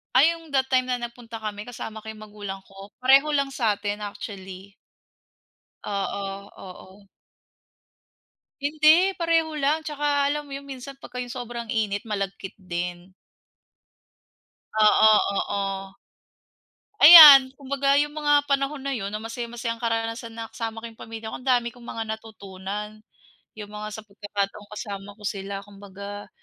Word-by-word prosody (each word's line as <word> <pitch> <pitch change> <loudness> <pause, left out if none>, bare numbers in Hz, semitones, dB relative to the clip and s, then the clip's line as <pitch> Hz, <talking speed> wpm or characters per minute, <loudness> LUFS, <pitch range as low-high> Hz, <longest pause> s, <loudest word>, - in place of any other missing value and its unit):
Ay 300 +6 +6
yung 330 -1 -9
that 265 0 +1
time 255 0 +2
na 250 - 0
nagpunta 235 -1 -8
kami 215 0 -6
kasama 220 -2 -7
ko 220 - -15
yung 215 -1 -8
magulang 205 -2 -8
ko. 195 +1 -13 0.2
Pareho 275 +3 +5
lang 275 -1 0
sa'tin, 210 -4 -1
actually. 195 -2 -8 1.1
Oo, 200 0 -4
oo. 190 +2 -13 1.5
Hindi. 310 +6 +4
Pareho 330 -1 +1
lang 300 +3 +1
tsaka 290 -1 0
alam 295 0 -4
mo 275 - -7
yung 280 - -7
minsan 270 0 -8
pagka 250 -2 -9
yung 245 -1 -5
sobrang 240 -2 -6
init 215 -1 -2
malagkit 195 -2 -4
din. 180 0 -6 1.7
Oo, 215 +1 +6 0.3
oo. 195 -1 -3 1.1
Ayan, 290 -5 +12
kumbaga 275 +1 +1
'yong 295 +1 -1
mga 290 -1 +2
panahon 280 +1 0
na 275 0 -3
yun 200 -2 -4
na 215 - -4
masayang-masayang 230 +1 -5
karanasan 230 0 -2
na 225 0 -7
kasama 225 -1 -5
ko 230 - -7
'yong 225 - -14
pamilya 225 0 -8
ko, - - -6
ang 250 - -10
dami 245 -2 +3
kong 240 - -15
mga 225 -1 -5
natutunan. 210 0 -8 0.5
'Yong 210 -1 -8
mga 210 0 -6
sa 220 - -9
pagkakataong 205 0 -5
kasama 200 -1 -7
ko 210 - -18
sila 195 0 -4
kumbaga, 200 0 -10
225 Hz, 145 wpm, -24 LUFS, 200-270 Hz, 1.7 s, Ayan